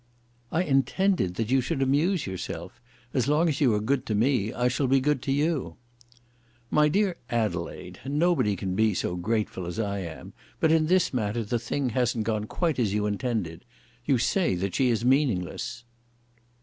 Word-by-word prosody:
"I 175 - +1
intended 140 - +1
that 115 +3 -2
you 135 0 +4
should 135 +4 -2
amuse 145 +6 +2
yourself. 95 +3 -6 0.3
As 130 -2 +1
long 150 +4 +3
as 150 -1 -1
you 130 -5 +5
are - - +1
good 130 +5 0
to 110 - 0
me, 110 -1 +2
I 125 0 0
shall 130 +2 0
be 135 +1 +4
good 145 0 +1
to 135 - -2
you." 150 +1 0 1.0
"My 150 0 +4
dear 190 +1 +1
Adelaide, 105 -8 -3
nobody 145 - +1
can 95 0 -3
be 110 0 +2
so 90 - -1
grateful 95 -1 -2
as 85 - -5
I 100 -3 -1
am. 85 -4 -8 0.3
But 160 - +3
in 160 -1 +3
this 185 -2 +2
matter 115 -1 -1
the 115 +3 -1
thing 125 +3 -2
hasn't 120 -1 0
gone 105 -1 -1
quite 160 +4 -1
as 105 -4 +1
you 105 0 +1
intended. 105 -5 -2 0.4
You 135 0 +2
say 165 - +1
that 95 +1 -2
she 130 -2 +2
is 115 0 0
meaningless." 120 -4 0
125 Hz, 180 wpm, -27 LUFS, 105-145 Hz, 1.0 s, you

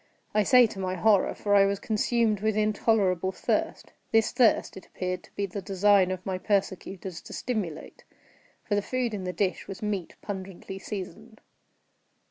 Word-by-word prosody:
I 210 - +4
say 250 +4 +6
to 210 -3 -6
my 185 -1 -2
horror—for 205 +1 +2
I 200 -1 +6
was 200 0 0
consumed 220 -1 +1
with 215 +1 0
intolerable 205 -4 +2
thirst. - - -2 0.2
This 225 -1 +3
thirst 235 -4 +3
it 190 - -11
appeared 185 0 -4
to - - -25
be 200 - -1
the 200 +1 -6
design 195 0 +3
of 185 -1 -4
my 185 -1 -2
persecutors 190 -3 -2
to - - -11
stimulate—for 205 -1 -6
the 205 - +2
food 250 +1 -2
in 195 -3 -4
the 180 - -2
dish 185 +1 -1
was 195 +3 -7
meat 200 -5 -3
pungently 190 -1 -6
seasoned. 215 +3 -7
200 Hz, 160 wpm, -27 LUFS, 185-215 Hz, 0.2 s, say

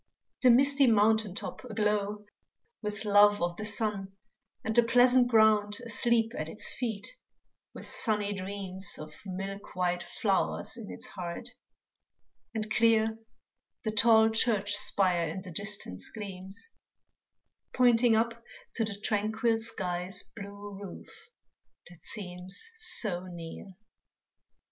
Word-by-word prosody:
The 255 - +6
misty 275 +2 +5
mountain 220 -2 +3
top - - -6
aglow 210 -3 -1 0.6
With 210 -1 -3
love 205 0 +6
of 175 0 -1
the 215 - -4
sun, 205 -2 -2 0.5
and 220 0 -2
the 240 - +8
pleasant 245 +1 +5
ground 215 -3 +4
Asleep 230 0 +2
at 155 +1 -4
its 215 - -2
feet, 230 - -4 0.6
with - - -8
sunny 210 -2 0
dreams 195 0 -4
Of 155 0 -9
milk 195 +1 -6
white 180 -1 0
flowers 190 +5 -1
in 230 -4 -9
its - - -7
heart, 180 +6 -6 1.0
and 220 -1 -3
clear 225 -1 +3 0.6
The 220 - -1
tall 220 0 +5
church 215 -3 +2
spire 180 -4 +1
in 180 +4 -5
the 185 - -9
distance 200 - -3
gleams 195 - -7 1.0
Pointing 240 -2 +5
up 230 +1 0 0.4
to 230 - +2
the 205 -2 -3
tranquil 220 +2 0
sky's 185 -4 -1
Blue 200 -1 -8
roof 195 -3 -11 0.6
that 175 - -17
seems 185 - -2
so 195 - -1
near. 175 +2 -9
210 Hz, 120 wpm, -30 LUFS, 190-225 Hz, 1.0 s, the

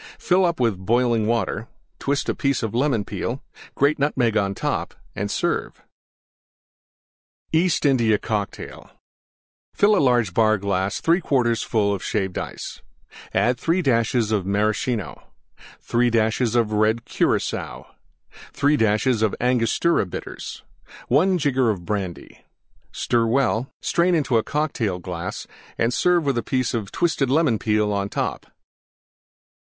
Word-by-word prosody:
Fill 185 +1 +2
up 170 -4 -1
with 115 -6 +1
boiling 115 0 +2
Water; 115 -1 -1 0.3
twist 140 0 -1
a - - +1
piece 140 -3 -1
of 110 - -3
Lemon 120 -4 +1
Peel 115 - -3 0.2
and - - -19
grate 145 +2 +2
Nutmeg 125 -6 +1
on 100 -2 +1
top - - -3 0.2
and - - -3
serve. - - -2 1.7
EAST 160 -1 +2
INDIA 120 -6 +3
COCKTAIL 105 -1 -5 0.9
Fill 205 -2 +4
large 120 -8 +2
Bar 110 +1 +3
glass 100 0 -1
3/4 135 -9 +1
full 100 -3 0
Shaved 95 -1 -2
Ice. - - -7 0.5
3 165 +9 +1
dashes 115 -3 +1
Maraschino. 105 +3 -1 0.6
3 120 +1 +1
dashes 115 +1 +1
Red 110 0 +1
Curacoa. - - -1 0.7
3 145 +1 +2
dashes 110 +1 +2 0.2
Angostura 125 - +1
Bitters. - - -7 0.5
1 180 +8 +3
jigger 130 -7 +1
Brandy. 95 -1 -5 0.5
Stir 115 -1 0
well; 130 0 +1
strain 175 +1 +2
into 135 -7 +2
Cocktail 140 -9 -1
glass 90 0 -6 0.3
and 115 +2 +1
serve 175 +1 +2
with 135 -4 +1
a - - -2
piece 130 +3 -1
of 110 -5 -3
twisted 165 -7 0
Lemon 140 -6 +2
Peel 105 -1 +1
on 100 0 -1
top. - - -3
115 Hz, 120 wpm, -23 LUFS, 105-140 Hz, 1.7 s, Fill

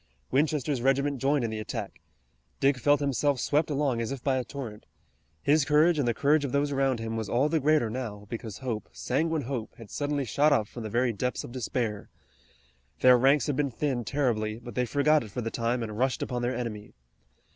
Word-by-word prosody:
Winchester's 145 -2 +1
regiment 135 +1 +1
joined 140 0 +2
in 115 - -1
the 110 - -4
attack. 110 - -6 0.6
Dick 135 0 +3
felt 145 +3 +3
himself 140 0 +1
swept 150 +6 +1
along 140 -5 0
as 115 - -3
if 135 -3 -6
by 135 -2 +2
a 130 - -1
torrent. 120 -6 -8 0.6
His 150 +1 +4
courage 150 +3 +4
and 135 - +1
the 120 - +2
courage 145 +3 +3
of 140 - -2
those 145 +1 +1
around 135 -3 +1
him 115 0 -4
was 110 -2 -3
all 130 +7 +2
the 160 0 +2
greater 150 -4 +3
now, 110 -3 -5
because 115 -1 -6
hope, 115 -4 -3
sanguine 160 +3 -1
hope, 120 -3 -5
had 115 -3 -12
suddenly 145 -1 -1
shot 145 +7 +3
up 110 -7 +2
from 120 - -9
the 110 - -5
very 120 +2 +1
depths 125 +4 -2
of - - -9
despair. 120 -4 -3 0.9
Their 125 0 +8
ranks 135 +4 +4
had 145 - -1
been 140 0 +1
thinned 125 -2 -2
terribly, 110 -7 0
but 120 0 -10
they 125 +3 0
forgot 145 +3 +3
it 110 - -9
for 125 - -4
the 115 0 -3
time 120 +1 -1
and 110 -2 -5
rushed 130 0 +1
upon 125 -1 -3
their 120 +1 -1
enemy. 110 -4 -5
130 Hz, 210 wpm, -28 LUFS, 115-145 Hz, 0.9 s, Their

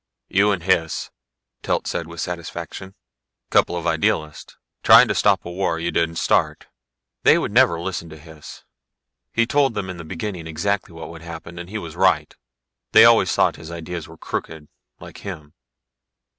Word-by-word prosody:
"You 100 +2 +3
and 95 -4 -2
Hys," 85 -4 0 0.5
Telt - - -1
said 85 - -3
with 85 0 -10
satisfaction. 90 +2 -6 0.6
"Couple 85 - +3
of 85 - -5
idealists. 75 -2 -1 0.2
Trying - - +8
to - - +2
stop - - +2
a 85 - -6
war 90 -2 -1
you 85 +1 -2
didn't 85 0 0
start. - - +1 0.6
They - - +6
never 85 - +3
would 85 - -6
listen 90 -3 -4
to 80 - -11
Hys. 80 -1 -13 0.7
He 115 - +2
told 135 -1 +1
them 95 -3 -3
in 90 - -9
the 85 - -8
beginning 85 +1 -6
exactly 90 +4 -2
what 80 0 -9
would 85 0 -11
happen, 85 +1 -9
and 90 0 -8
he 110 - -4
was 85 -6 -7
right. - - +2 0.6
They - - +9
always - - +5
thought - - +2
his 80 - -10
ideas 85 0 -6
were 80 - -14
crooked, 80 -1 -6 0.3
like - - -12
him. 75 -7 -8
85 Hz, 170 wpm, -22 LUFS, 80-95 Hz, 0.7 s, They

